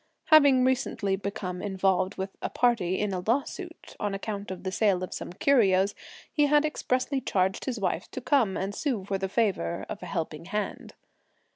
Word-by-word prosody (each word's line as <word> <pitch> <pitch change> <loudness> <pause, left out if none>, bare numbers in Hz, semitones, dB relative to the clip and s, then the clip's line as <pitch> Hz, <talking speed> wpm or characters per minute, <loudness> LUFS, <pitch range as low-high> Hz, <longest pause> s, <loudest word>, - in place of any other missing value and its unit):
Having 280 -5 +7
recently 245 -6 0
become 195 -2 -4
involved 190 -1 +1
with 190 +1 -3
some - - -2
party 225 -7 +2
in 205 -2 -1
a 180 - -2
lawsuit, 310 - -3
on 205 -1 -1
account 200 0 -5
of 185 -1 -6
the 185 - -2
sale 190 -2 +2
of 185 - -5
some - - -6
curios, 200 -3 +3 0.4
he 295 -2 +3
had 295 +1 +4
expressly 265 -2 -1
charged 190 -4 0
his 250 -4 -2
wife 185 -3 -2
to - - -5
come 250 -7 +2
and 195 +2 -2
sue 230 -5 -2
for 195 -1 -2
the 190 0 -2
favour 195 -5 0
(of 205 - -6
a - - -7
helping 160 -2 -4
hand). 210 +3 -4
200 Hz, 180 wpm, -28 LUFS, 190-255 Hz, 0.4 s, Having